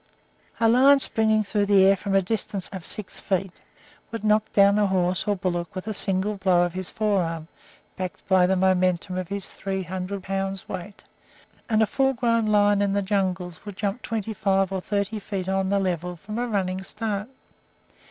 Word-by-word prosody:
A 230 - +4
lion 265 +5 +6
springing 220 -4 +2
through 205 0 0
the 195 -2 +6
air 195 +1 +6
from 195 0 -2
a 195 - +4
distance 195 -1 -3
of 190 -3 -7
six 210 +2 -2
feet 190 -1 -2 0.5
would 230 -2 -5
knock 215 0 +2
down 200 +1 +5
a 205 - +3
horse 185 0 0
or 205 - +2
bullock 175 -2 -3
with 185 - -5
a 215 - -3
single 200 +1 0
blow 185 -2 +3
of 175 -1 -2
his 185 0 -4
forearm, 175 -7 -1 0.5
backed 185 -1 -6
by 185 -2 +4
the 190 - +2
momentum 185 0 +1
of 185 -1 -3
his 200 0 -4
three 190 -1 -4
hundred 185 +2 -5
pounds' 195 0 -3
weight, 190 +2 -7 0.7
and 220 -1 +3
a - - +4
full 270 +4 +1
grown 230 -2 +1
lion 205 -1 +4
in 200 -1 +1
the 200 0 +1
jungles 185 -3 -2
will 205 0 -7
jump 200 +4 -3
twenty 220 -1 -3
five 195 -1 +1
or 190 -1 -2
thirty 205 +2 -2
feet 195 -3 -4
on 190 0 0
the 200 - +2
level 180 -2 -2
from 210 +6 -6
a 245 - -1
running 190 -4 -1
start. 210 +2 -4
195 Hz, 190 wpm, -25 LUFS, 185-210 Hz, 0.7 s, lion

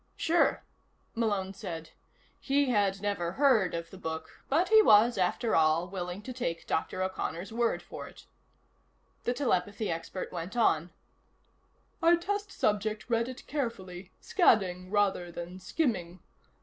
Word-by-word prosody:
"Sure," 335 +1 +2 0.5
Malone 205 -4 -1
said. 165 -4 -7 0.5
He 280 -1 +1
had 200 -3 +1
never 180 -4 -1
heard 240 -10 +3
of 170 0 -5
the 190 - -11
book, 160 -2 -6
but 330 +7 +2
he 440 0 +8
was, 235 - +6
after 195 +5 +1
all, 160 +2 +3
willing 180 +1 -5
to 255 - -6
take 170 -10 -3
Dr. 185 +3 -1
O'Connor's 185 +1 -4
word 235 0 0
for - - -8
it. - - -15 1.0
The 245 - +1
telepathy 205 -5 0
expert 165 +3 -5
went 180 +6 -5
on: 170 -7 +3 1.1
"Our 335 +1 +6
test 405 +3 -3
subject 215 +2 -1
read 230 +1 +1
it 255 +1 -9
carefully, 195 -10 -4
scanning 185 - +2
rather 195 -4 +1
than 175 +2 -7
skimming. 185 - -2
200 Hz, 135 wpm, -30 LUFS, 180-240 Hz, 1.1 s, he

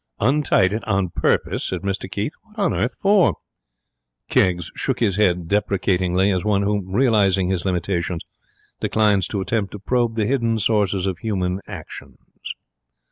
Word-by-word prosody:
'Untied 125 -7 +3
it 110 0 -3
on 100 -3 +1
purpose?' - - 0
said - - -3
Mr 95 -1 -3
Keith. 105 - -3
'What 220 -1 -25
on 200 -4 +1
earth 125 - -1
for?' 195 - +4 1.0
Keggs 90 -4 +2
shook - - -2
his 100 -5 +1
head 90 -5 +2
deprecatingly, 95 -1 +1
as 90 -2 0
one 100 -1 +1
who, 100 -2 -1
realizing 100 -5 +3
his 95 -1 -2
limitations, 90 -2 -1 0.6
declines 105 -3 +2
to 100 - -3
attempt 100 -1 -2
to 105 - -7
probe 120 +2 0
the 110 -2 +1
hidden 115 -2 +1
sources 100 -4 +1
of 95 -2 -2
human 95 -3 -2
actions. - - -9
100 Hz, 150 wpm, -21 LUFS, 95-110 Hz, 1.0 s, for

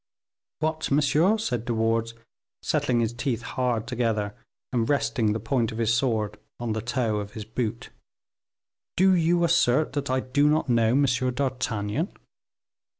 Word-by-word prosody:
"What, 155 0 -1
monsieur," 150 +8 +3
said 125 - -2
De 120 -2 -1
Wardes, 115 +1 0 0.5
setting 120 -2 +1
his 115 0 -1
teeth 120 -2 -2
hard 120 -2 -1
together, 115 -4 -1 0.4
and 115 -2 +1
resting 125 -6 +1
the 110 - -1
point 115 +1 0
of 110 - -7
his 115 -1 +2
sword 110 -4 0 0.2
on 120 -2 -2
the 110 - -2
toe 120 -2 -1
of 105 0 -5
his 110 -2 -7
boot, 115 0 -4 1.1
"do 190 +1 +5
you 170 0 +3
assert 155 -4 +3
that 140 -1 -2
I 130 0 +2
do 140 +3 +2
not 155 0 +1
know 115 -1 +3
M. 140 +2 +4
d'Artagnan?" 125 - -1
120 Hz, 150 wpm, -26 LUFS, 115-140 Hz, 1.1 s, do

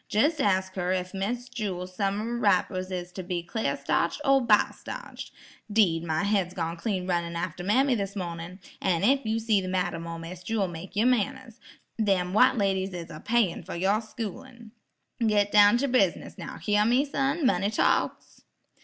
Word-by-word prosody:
Jes' 295 +9 +2
ask 190 -5 +1
her 180 0 0
ef 185 0 -3
Miss 235 +6 -3
Jewel's 185 -6 -5
summer 210 +4 -1
wrappers 185 -4 +1
is 180 -1 -5
to 185 - -6
be 180 -1 -3
clar 220 +6 -2
starched - - 0
or 275 -1 +5
biled 220 -4 +3
starched. - - -8 0.4
'Deed, 180 -7 +3
my 160 +1 -1
head's 195 -3 0 0.2
clean 190 -2 -2
gone - - -8
runnin' 170 0 -4
after 175 0 -4
mammy 255 +8 +3
this 200 -3 -3
mornin'. 175 -1 -5 0.2
An' 180 -2 +1
ef 270 +6 +4
you 220 +1 +1
see 220 -3 +2
the 185 - -5
madam 180 -2 -2
or 165 0 -5
Miss 165 +2 -8
Jewel, 200 +1 -1
make 175 +2 -9
yer 215 +3 +2
manners. 250 0 0 0.4
Them 190 -4 +1
white 255 +4 +5
ladies 195 -2 0
is 170 -1 -7
apayin' 195 +3 0
fer 180 - -7
yer 195 +5 +1
schoolin'. 230 +1 -8 0.5
Git 205 -2 +2
down 205 +2 +7
ter 280 +3 0
bus'ness, 245 -9 +1
now, - - -8
hyar 210 0 +2
me, 245 +6 +3
son? 280 +2 -1
money 200 -5 +2
talks." 215 - 0
200 Hz, 180 wpm, -27 LUFS, 180-225 Hz, 0.5 s, down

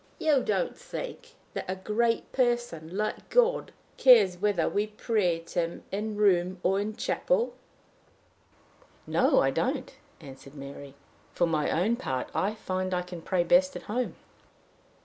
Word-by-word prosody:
You 300 -4 +3
don't 195 -6 -1
think, - - -6
miss, 485 0 -20 0.2
that - - -4
a 185 - -1
great 225 +4 0
person 240 -10 -1
like 215 0 -3
God - - +2 0.3
cares 210 -9 +6
whether 205 0 +1
we 205 +1 0
pray 210 -5 0
to 170 +2 -4
him 170 0 -3
in 210 +2 -2
a - - -7
room 185 -3 +2
or 190 +2 +2
in 205 +1 -1
a - - -7
church?" 480 - 0 1.5
"No, - - +3
I - - +2
don't," - - -2 0.3
answered 135 +1 -12
Mary. 140 0 -9 0.4
"For 175 - +3
my 155 -3 0
own 210 +8 +1
part, 130 - -3
I 205 +3 0
find 185 -3 -2
I 180 - -1
can 180 -1 -8
pray 180 +1 +1
best 275 +9 +4
at - - -6
home." 245 +4 -2
200 Hz, 160 wpm, -28 LUFS, 175-235 Hz, 1.5 s, cares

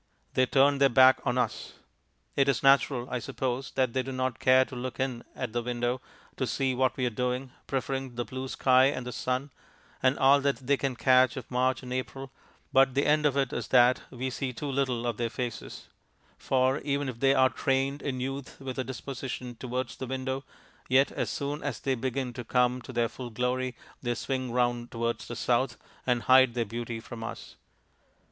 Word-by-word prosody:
They 130 0 +3
turn 140 +2 +4
their 140 -1 +5
backs 130 +1 +6
on 125 - +1
us. 125 - -2 0.6
It 140 0 +3
is 135 - +1
natural, 135 -2 +4
I 125 - -1
suppose, 130 +2 -3
that 130 -3 +1
they 130 - +1
do 135 +1 -6
not 130 -1 -2
care 130 0 +5
to 130 - -10
look 125 +1 -5
in 130 -3 -2
at 125 -4 -4
the 120 - 0
window 120 +1 -2 0.4
to - - -1
see 135 -1 0
what 130 0 +1
we 130 - 0
are 120 - 0
doing, 125 +3 -2 0.2
preferring 135 -1 -3
the 120 0 -2
blue 130 +4 -5
sky 130 0 +4
and 130 -2 0
the 125 - -4
sun, 130 +3 -2 0.5
and 130 +2 +3
all 140 +1 +5
that 140 0 +1
they 140 +2 +4
can 135 -2 -2
catch 130 +1 +4
of 130 - -8
March 130 +1 +1
and 125 0 -5
April, 135 +1 -5 0.4
but 135 -1 +5
the 140 - +2
end 150 0 +4
of 140 -1 -1
it 135 -2 0
is - - -3
that 125 0 +5
we 130 +1 -4
see 130 +1 -3
too 125 +4 -7
little 130 -3 0
of 120 -3 -1
their 120 -1 -1
faces; 120 -1 -6 0.5
for 130 +1 +1
even 140 0 -1
if 125 -3 -5
they 135 +1 +4
are 130 -1 +5
trained 135 +1 0
in 130 -3 -3
youth 135 +1 -5
with 135 -1 -5
a - - +1
disposition 130 -1 -6
towards 125 0 -4
the 130 - -5
window, 130 +1 -3 0.5
yet 135 +2 +4
as - - -2
soon 145 +1 -3
as 140 -6 -3
they 135 - 0
begin 130 0 -2
to 120 0 -6
come 125 +1 +1
to 130 - -9
their 120 -2 +1
full 125 +1 -8
glory 125 +2 -1 0.3
they 120 -1 -1
swing 130 0 -3
round 120 -1 0
towards 115 0 -3
the - - -5
south 120 -1 0 0.3
and 120 -2 +1
hide 130 -2 +6
their 120 -1 0
beauty 115 +1 -5
from 115 0 -8
us. 115 - -7
130 Hz, 205 wpm, -28 LUFS, 125-135 Hz, 0.6 s, backs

